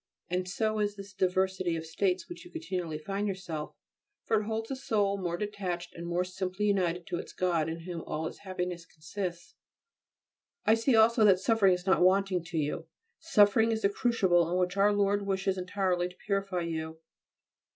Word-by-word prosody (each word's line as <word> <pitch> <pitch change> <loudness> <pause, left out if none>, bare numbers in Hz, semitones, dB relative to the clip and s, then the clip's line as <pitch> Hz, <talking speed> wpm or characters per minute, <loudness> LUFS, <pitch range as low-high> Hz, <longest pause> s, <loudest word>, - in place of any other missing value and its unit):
And 180 0 -1
so 215 +2 0
is 205 -1 0
this 200 -1 -10
diversity 185 -1 +1
of 160 0 -4
states 180 +3 0
in - - -27
which 350 - -8
you 355 - -13
continually 185 - -4
find 195 +6 -3
yourself, 180 -6 -5 0.5
for 220 -1 +2
it - - -6
holds 225 0 -3
the 270 - -2
soul 210 -6 0
more 175 -2 -2
detached 185 -4 -4
and 170 0 -7
more 175 +1 +1
simply 185 +2 -3
united 180 -4 +1
to 175 - -3
its - - -8
God 170 -4 0
in 165 +1 -5
whom 170 -1 -5
all 155 +1 -2
its - - -6
happiness 180 -3 -4
consists. 170 +2 -6 1.1
I 215 - +6
see 230 +3 +3
also 225 +1 +5
that 190 -3 +6
suffering 195 -2 +4
is 180 0 -8
not 190 -1 +3
wanting 185 -1 +3
to 170 -1 -5
you. 150 -1 -2 0.3
Suffering 225 -7 +4
is 220 -1 -2
the 200 - +4
crucible 190 -7 +2
in 180 - +1
which 180 0 0
Our 200 +1 +4
Lord 205 0 +1
wishes 190 0 0
entirely 185 -1 -1
to 180 - -16
purify 195 -3 -1
you. 160 -1 -4
190 Hz, 190 wpm, -30 LUFS, 175-205 Hz, 1.1 s, I